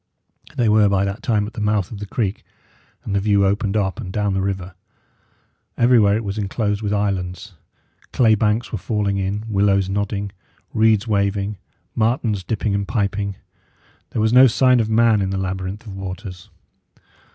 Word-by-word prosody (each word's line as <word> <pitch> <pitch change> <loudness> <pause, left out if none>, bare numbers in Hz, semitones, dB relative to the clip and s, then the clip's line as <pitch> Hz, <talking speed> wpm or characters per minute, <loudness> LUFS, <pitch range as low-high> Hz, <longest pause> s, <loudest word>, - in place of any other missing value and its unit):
They 120 - +2
were 105 -1 +4
by 100 0 +2
that 100 +3 -4
time 105 -4 +1
at 110 - -8
the - - -5
mouth 105 -3 0
of 105 - -7
the 105 - -6
creek, 110 +2 -2 0.6
and 100 - -4
the 100 - +2
view 100 0 +2
opened 100 +1 0
up 100 +3 -1
and 95 -5 -6
down 105 0 0
the 95 - 0
river. 95 -1 -3 1.0
Everywhere 115 -4 +4
it 110 - -2
was 100 +1 -4
enclosed 105 0 -1
with 105 -2 -2
islands. 100 -1 -2 0.6
Clay 115 -3 +4
banks 110 +2 0
were 110 - -3
falling 100 -1 -1
in, 100 +2 -2
willows 100 -2 +2
nodding, 100 0 -2 0.4
reeds 110 0 +3
waving, 100 -1 -1 0.3
martens 110 -3 0
dipping 105 +1 -2
and 100 0 -1
piping. 100 -2 -1 0.7
There 110 - -2
was 110 +1 +2
no 130 +1 +8
sign 125 +1 +3
of 110 -1 0
man 110 -1 +4
in 95 - -1
the 95 - -2
labyrinth 95 +3 -4
of 100 -3 -8
waters. 95 -1 -7
105 Hz, 175 wpm, -21 LUFS, 100-110 Hz, 1.0 s, no